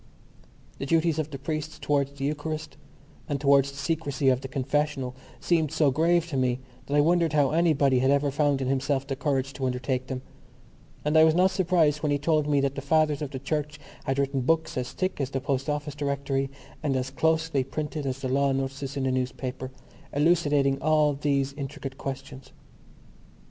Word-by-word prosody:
The 135 Hz, -, -3 dB
duties 165 Hz, 0 st, +2 dB
of 155 Hz, -1 st, -2 dB
the 140 Hz, -, -6 dB
priest 155 Hz, +2 st, -4 dB
towards 140 Hz, -1 st, +1 dB
the 135 Hz, -1 st, -4 dB
Eucharist 155 Hz, +1 st, -3 dB, 0.5 s
and 145 Hz, -2 st, -1 dB
towards 140 Hz, 0 st, +4 dB
the 140 Hz, -, -11 dB
secrecy 145 Hz, -3 st, 0 dB
of 130 Hz, 0 st, +2 dB
the 135 Hz, -, -5 dB
confessional 135 Hz, 0 st, -1 dB, 0.2 s
seemed 160 Hz, -4 st, +1 dB
so 150 Hz, -4 st, +3 dB
grave 165 Hz, +4 st, +3 dB
to 140 Hz, -, -2 dB
me 125 Hz, -1 st, +1 dB, 0.3 s
that 145 Hz, -, -1 dB
I -, -, +6 dB
wondered 165 Hz, 0 st, +2 dB
how 145 Hz, -3 st, +3 dB
anybody 150 Hz, -5 st, +3 dB
had 130 Hz, +1 st, +2 dB
ever 140 Hz, 0 st, +2 dB
found 145 Hz, -1 st, +1 dB
in -, -, -2 dB
himself 135 Hz, +1 st, 0 dB
the 135 Hz, -1 st, -3 dB
courage 135 Hz, -1 st, -1 dB
to 135 Hz, -, -3 dB
undertake 130 Hz, 0 st, -2 dB
them; 130 Hz, -1 st, -5 dB, 0.8 s
and 150 Hz, +1 st, +1 dB
I 160 Hz, -, +8 dB
was 160 Hz, 0 st, +5 dB
not 185 Hz, +2 st, +4 dB
surprised 170 Hz, -5 st, +2 dB
when 150 Hz, -2 st, 0 dB
he 145 Hz, -, +2 dB
told 150 Hz, 0 st, +1 dB
me 145 Hz, -1 st, +3 dB
that 140 Hz, -1 st, 0 dB
the 140 Hz, -, -5 dB
fathers 150 Hz, 0 st, +2 dB
of 150 Hz, -, -3 dB
the 135 Hz, -, -6 dB
Church 150 Hz, +2 st, -3 dB, 0.3 s
had 135 Hz, 0 st, 0 dB
written 140 Hz, -1 st, 0 dB
books 160 Hz, +5 st, +1 dB
as 125 Hz, -1 st, -3 dB
thick 185 Hz, -1 st, -2 dB
as 130 Hz, -, -1 dB
the 135 Hz, -, -2 dB
Post 135 Hz, +1 st, -2 dB
Office 150 Hz, 0 st, -2 dB
Directory 140 Hz, -1 st, -1 dB, 0.3 s
and 145 Hz, -3 st, 0 dB
as 130 Hz, +1 st, -2 dB
closely 160 Hz, -1 st, +1 dB
printed 150 Hz, +2 st, -4 dB
as 135 Hz, +1 st, -3 dB
the 130 Hz, -, -2 dB
law 140 Hz, +1 st, +2 dB
notices 135 Hz, +1 st, -3 dB
in 135 Hz, -, -1 dB
the 130 Hz, -, +1 dB
newspaper, 130 Hz, 0 st, -3 dB, 0.4 s
elucidating 145 Hz, -3 st, +2 dB
all 150 Hz, -1 st, +3 dB
these 140 Hz, -1 st, 0 dB
intricate 135 Hz, -1 st, -6 dB
questions. 135 Hz, 0 st, -7 dB
140 Hz, 195 wpm, -27 LUFS, 135-155 Hz, 0.8 s, I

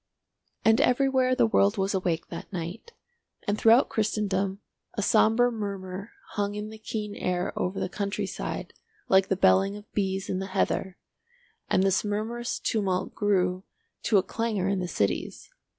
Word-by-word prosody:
And 225 Hz, +1 st, +5 dB
everywhere 260 Hz, 0 st, +3 dB
the 245 Hz, -2 st, +4 dB
world 205 Hz, -1 st, +3 dB
was 195 Hz, +1 st, 0 dB
awake 175 Hz, -4 st, -1 dB
that 170 Hz, -, -8 dB
night, 180 Hz, -, -6 dB, 0.5 s
and 205 Hz, -, +2 dB
throughout 225 Hz, +4 st, +5 dB
Christendom 200 Hz, -3 st, 0 dB, 0.4 s
a 205 Hz, -, -1 dB
sombre 225 Hz, +3 st, +4 dB
murmur 200 Hz, -2 st, -5 dB, 0.2 s
hung 205 Hz, -1 st, -2 dB
in 210 Hz, +1 st, -5 dB
the 220 Hz, -, -10 dB
keen 215 Hz, -1 st, -4 dB
air 180 Hz, -2 st, -2 dB
over 185 Hz, +2 st, -2 dB
the -, -, -1 dB
country 200 Hz, +2 st, -2 dB
side -, -, -5 dB, 0.4 s
like 190 Hz, 0 st, +5 dB
the 195 Hz, -, +1 dB
belling 195 Hz, +2 st, +3 dB
of 210 Hz, 0 st, -15 dB
bees 195 Hz, -1 st, -1 dB
in 185 Hz, -, -1 dB
the 190 Hz, -, -4 dB
heather, 190 Hz, 0 st, -1 dB, 0.7 s
and 190 Hz, -, +3 dB
this 195 Hz, 0 st, +2 dB
murmurous 220 Hz, +3 st, -2 dB
tumult 195 Hz, -5 st, -1 dB
grew 185 Hz, -3 st, +1 dB, 0.4 s
to 215 Hz, -, +3 dB
a 190 Hz, -, +4 dB
clangour 215 Hz, -1 st, -1 dB
in 195 Hz, -1 st, +1 dB
the 180 Hz, -, -2 dB
cities. 100 Hz, -, -2 dB
200 Hz, 160 wpm, -27 LUFS, 190-220 Hz, 0.7 s, And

